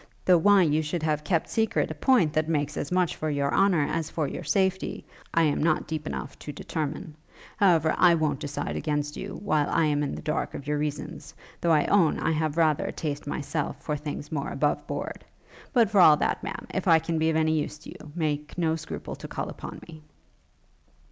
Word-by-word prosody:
though 180 - +6
why 200 +1 +6
you 155 -1 +2
should 155 +1 -3
have 150 -1 0
kept 165 0 0
secret 220 -10 0
a - - -2
point 170 - +3
that 155 +1 0
makes 150 -2 0
as 145 - -4
much 180 -2 +1
for 155 - -3
your 140 -1 0
honour 190 -6 +4
as 160 -1 -2
for 155 -3 -1
your 175 - -6
safety, 190 +4 0 0.3
I 165 - +3
am 150 -2 +1
not 155 0 +2
deep 155 -1 -4
enough - - -5
to 150 - -7
determine. 155 +1 -4 0.4
However, 165 -6 +4
I 170 - +5
won't 155 -4 0
decide 145 0 -4
against 150 -1 -2
you, 195 - -6
while 155 -7 +1
I 165 - +2
am 145 -1 +1
in 145 - -2
the - - -8
dark 155 +1 -2
of 140 - -7
your 150 0 -1
reasons; 150 -1 -5 0.3
though 170 - +2
I 150 -2 +4
own 180 -6 +3
I - - 0
have 155 -1 -1
rather 155 -3 +3
a - - -2
taste 145 -2 -4
myself 145 +1 -3
for 150 - -1
things 150 0 -6
more 145 -3 -2
above 145 +1 -1
board. - - -5 0.5
But 230 -5 +3
for 200 -3 +5
all 155 -3 +8
that, - - 0
Ma'am, - - -6
if 190 - -2
I 165 -2 +7
can 165 0 -2
be 160 +1 +2
of 160 - 0
any 160 0 +2
use 150 - -5
to 155 - -13
you, 150 - -12
make 150 -2 -2
no 160 -2 +1
scruple 160 -1 -6
to - - -8
call - - -4
upon - - -8
me.' 160 -2 -12
155 Hz, 220 wpm, -27 LUFS, 150-165 Hz, 0.5 s, all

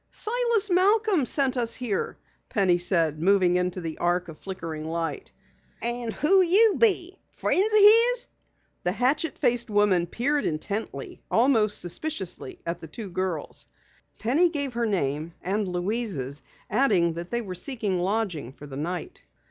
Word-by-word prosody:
"Silas 465 -3 0
Malcom 385 - +3
sent 270 -1 +1
us 235 -2 -1
here," 235 -6 -3 0.3
Penny 185 -4 +2
said, 165 -4 0
moving 185 -1 +3
into 180 0 -1
the 165 -3 -6
arc 175 0 0
of 155 - -10
flickering 165 -5 -6
light. 165 - -4 0.5
"And 240 -1 -2
who 375 - +3
be 355 - +1
you? 415 -4 +4 0.2
Friends 410 +4 +1
o' 425 -1 +5 0.3
his?" - - -5 0.6
The 180 - 0
hatchet 275 - 0
faced 240 -1 0
woman 205 -4 +2
peered 285 - -1
intently, 160 -2 -4
almost 225 -4 +2
suspiciously 185 - -4
at 170 +1 -3
the 160 - -8
two 195 +5 -8
girls. 180 -4 -4 0.5
Penny 300 +10 +2
gave 285 -5 -3
her 235 0 -1
name 160 -4 -2
and 200 +3 -2
Louise's, 180 - -3 0.3
adding 195 -8 +2
that 170 +1 -7
they 240 0 -2
were 190 -3 -6
seeking 200 -1 -3
lodging 180 - -2
for 145 - -12
the 135 -2 -8
night. 170 +3 -5
205 Hz, 150 wpm, -26 LUFS, 175-275 Hz, 0.6 s, o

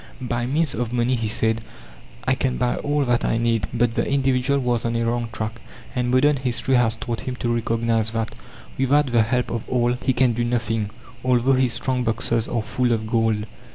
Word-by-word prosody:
"By 120 -1 -2
means 150 +2 +1
of 120 0 -2
money," 120 +1 +1
he 115 -2 -2
said, 110 +1 0 0.6
"I - - +3
can 60 -1 -1
buy 120 - 0
all 145 0 0
that 120 -1 +1
I - - +1
need." 115 -4 +1
But 120 -1 +1
the - - +1
individual 135 0 +1
was 120 -3 0
on 115 0 -1
a 115 0 0
wrong 120 0 -1
track, 110 +1 -5 0.3
and 125 -1 0
modern 140 +3 +4
history 130 0 -1
has 120 -3 +3
taught 115 0 -4
him 130 - -4
to 120 -1 -1
recognize 115 -1 0
that, 115 0 -3 0.5
without 135 +1 +3
the 120 -1 +4
help 125 +3 0
of 115 - -2
all, 120 -1 +2
he 130 - +2
can 125 -1 +3
do 120 +1 -1
nothing, 115 -3 -1 0.3
although 125 +1 +3
his 130 -2 +2
strong 130 -1 -1
boxes 115 0 0
are 115 -2 -1
full 120 +2 0
of 110 -1 -1
gold. 110 -1 +1
120 Hz, 205 wpm, -23 LUFS, 115-125 Hz, 0.6 s, modern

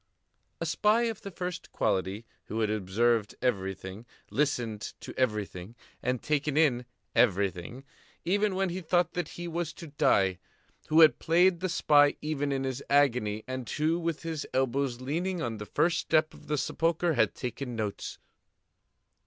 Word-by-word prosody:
A - - -2
spy 215 +3 +3
of 225 -2 -2
the 200 - -6
first 180 -1 -5
quality, 95 +4 -1 0.2
who 110 +1 -3
had 105 -1 +1
observed 110 +2 +1
everything, 95 -2 -3 0.2
listened 120 -7 -1
to - - -8
everything, 105 -4 -2 0.3
and 125 -1 -1
taken 150 -1 0
in 130 -6 +3 0.3
everything, 100 +2 +1 0.4
even 200 +2 +2
when 190 0 +1
he 180 +2 -4
thought 175 +1 +1
that 175 -3 -2
he 175 0 -5
was 170 -1 -2
to 170 - -10 0.2
die; 95 -2 +3 0.5
who 160 +2 +5
had 155 - +7
played 175 +2 +4
the 185 +1 -1
spy 145 -4 +4
even 145 -2 -2
in 135 -1 -1
his 130 0 -3
agony, 120 -7 +2
and 130 -2 -5
who, 160 +3 +1
with 165 -2 -3
his 160 -3 -3
elbows 130 -1 0
leaning 170 +7 -2
on 115 -6 -3
the 105 - -7
first 170 - +2
step 155 -1 +2
of - - -15
the 150 - 0
sepulchre, 165 +5 +1
had - - +2
taken 125 0 -5
notes. 105 -3 -4
140 Hz, 160 wpm, -29 LUFS, 115-165 Hz, 0.5 s, had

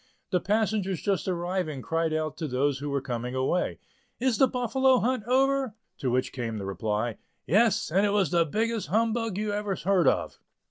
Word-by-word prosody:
The 180 - +3
passengers 205 -2 0
just 195 -6 -1
arriving 175 -5 -2
cried 165 0 0
out 155 -1 -1
to 160 -1 -3
those 135 +1 0
who 145 +1 -4
were 140 -1 -1
coming 125 -1 -4
away, 135 +8 0 0.4
"Is 245 -3 +1
the 265 - +6
Buffalo 255 +1 +2
Hunt 250 -1 0
over?" 265 -1 +2 0.2
To 130 - -1
which 130 +1 0
came 115 -4 -3
the 100 - -5
reply, 105 +3 -2 0.3
"Yes, 215 -1 +3
and 190 +4 +3
it 205 - +3
was 200 -6 +2
the 170 -1 +4
biggest 220 +6 -1
humbug 225 +2 0
you 210 0 -1
ever 205 -1 -1
heard 180 -3 +2
of!" - - +1
185 Hz, 185 wpm, -27 LUFS, 140-220 Hz, 0.4 s, the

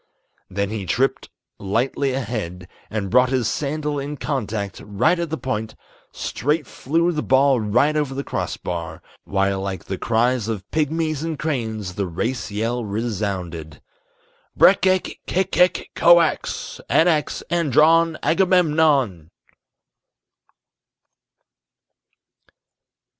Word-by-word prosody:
Then 100 +1 -2
he 105 -4 -4
tripped 135 +7 0 0.3
lightly 120 +7 0
ahead, 105 -9 -4 0.2
and 105 -3 -3
brought 125 0 +5
his 130 -4 0
sandal 150 +1 -2
in 145 +1 -5
contact 110 -9 -3
Right 105 - +1
at 170 -2 -2
the 160 - -3
point; 110 -5 -4 0.4
straight 150 +3 -1
flew 165 +8 0
the 150 -3 -2
ball 135 -1 +3
right 120 +8 +2
over 145 -3 -1
the 140 - -3
crossbar, 85 -9 -4 0.2
While 95 0 0
like 95 -3 -4
the 95 - -5
cries 120 0 +1
of 105 -4 -4
pygmies 155 -1 0
and 165 -2 -3
cranes 110 - -3
the 100 0 -2
race 115 +10 -3
yell 115 +4 -2
resounded: 100 -8 -4 0.8
"_Breck 190 0 +6
ek 185 -1 0
kek 190 +1 0
kek 180 0 +2
koax, 170 -2 +3
Anax 160 -3 +2
andron, 165 0 +4
Agamemnon! 155 - +2
130 Hz, 110 wpm, -22 LUFS, 100-155 Hz, 0.8 s, Breck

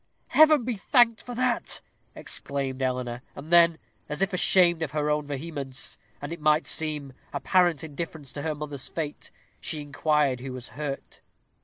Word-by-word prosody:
"Heaven 310 -4 +6
be 240 -2 -2
thanked 230 +1 +4
for 245 - -7
that!" 250 -1 0 0.4
exclaimed 135 -2 -3
Eleanor. 125 -2 -1
And 150 +4 -9
then, 170 -1 +6 0.3
as 150 +5 0
if 195 0 -1
ashamed 175 -2 +4
of 160 - -1
her 150 0 +1
own 150 -1 0
vehemence, 140 -2 -5 0.2
and, 145 - -4
it 170 - -8
might 155 +1 +3
seem, 150 -4 0 0.2
apparent 175 -4 +2
indifference 155 -2 -6
to 150 +2 -3
another's 145 -3 -5
fate, 150 -3 -5 0.3
she 155 - -3
inquired 145 -2 +1
who 130 +1 -6
was 130 -1 -7
hurt. 145 -2 -6
150 Hz, 155 wpm, -27 LUFS, 140-170 Hz, 0.4 s, Heaven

